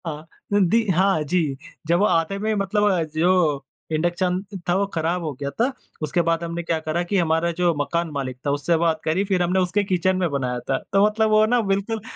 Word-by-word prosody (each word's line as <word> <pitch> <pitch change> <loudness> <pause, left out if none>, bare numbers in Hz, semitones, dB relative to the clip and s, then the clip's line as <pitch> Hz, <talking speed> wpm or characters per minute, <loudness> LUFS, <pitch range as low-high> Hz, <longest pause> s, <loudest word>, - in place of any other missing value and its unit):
हाँ 150 -2 -4 0.3
अ, 205 - +4
दि 220 +5 +3
हाँ 190 -1 +2
जी। 155 -3 0 0.3
जब 170 +1 +3
वो 205 - +4
आते 165 0 +1
हुए 215 +2 -1
मतलब 200 +1 0
अ, 175 -3 +1
जो 155 -2 +1 0.3
इंडक्शन 175 +3 0 0.3
था 175 - +3
वो 200 +1 +2
ख़राब 170 +2 -1
हो 155 - -2
गया 140 -1 -3
था। 235 - 0 0.3
उसके 155 +3 +1
बाद 165 0 0
हमने 170 0 -4
क्या 165 -1 -1
करा 155 +2 -2
कि 195 +3 -1
हमारा 165 -1 +1
जो 175 0 +1
मकान 170 +3 -1
मालिक 135 -3 -4
था 140 - +1
उससे 145 +4 +1
बात 160 -1 +1
करी। 165 +5 +1
फ़िर 190 -2 0
हमने 180 +2 +1
उसके 185 +3 +1
किचन 185 -1 +1
में 180 -2 0
बनाया 125 -3 -2
था। 135 - +2 0.2
तो 200 +1 +5
मतलब 215 +1 +1
वो 215 0 +5
ना 240 +2 +2
बिल्कुल 200 +2 -1
175 Hz, 220 wpm, -22 LUFS, 160-195 Hz, 0.3 s, तो